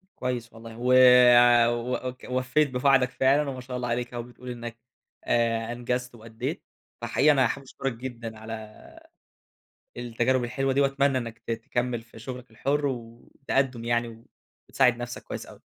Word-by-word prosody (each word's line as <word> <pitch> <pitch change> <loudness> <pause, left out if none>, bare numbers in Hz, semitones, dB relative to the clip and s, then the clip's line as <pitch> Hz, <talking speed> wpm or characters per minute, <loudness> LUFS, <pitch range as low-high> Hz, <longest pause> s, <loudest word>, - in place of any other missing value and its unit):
كويس 120 -2 -4
والله، 115 0 -11
و 125 +1 +2 1.1
وك 125 0 -8
ووفّيت 130 +4 +1
بوعدك 125 -1 +3
فعلًا، 140 +2 +2
وما 130 -1 -6
شاء 125 0 -6
الله 125 -1 -3
عليك 120 +1 -2
أهو، 120 -1 -4
بتقول 125 +1 -11
إنّك 120 -1 -7 0.5
آآ، 115 -1 +1
أنجزت 125 +1 -3
وأدّيت، 115 +8 -6 0.4
فحقيقي 135 +5 +3
أنا 130 -3 +4
حابب 140 +4 -4
أشكرك 135 0 -4
جدًا 115 -2 -7
على 110 -1 -10 1.0
التجارب 120 +1 0
الحلوة 135 +2 -1
دي، 140 - +2
وأتمنى 140 0 +2
إنّك 115 -2 -5
ت - - -1
تكمّل 120 +1 -2
في 115 -1 -15
شغلك 125 +1 -8
الحُرّ، 145 +6 -1
والتقدُّم 120 0 -3
يعني 115 -1 -2 0.4
وتساعد 125 -2 +3
نفسك 120 0 -6
كويس - - -6
أوي، - - -15
125 Hz, 150 wpm, -26 LUFS, 115-130 Hz, 1.1 s, أنا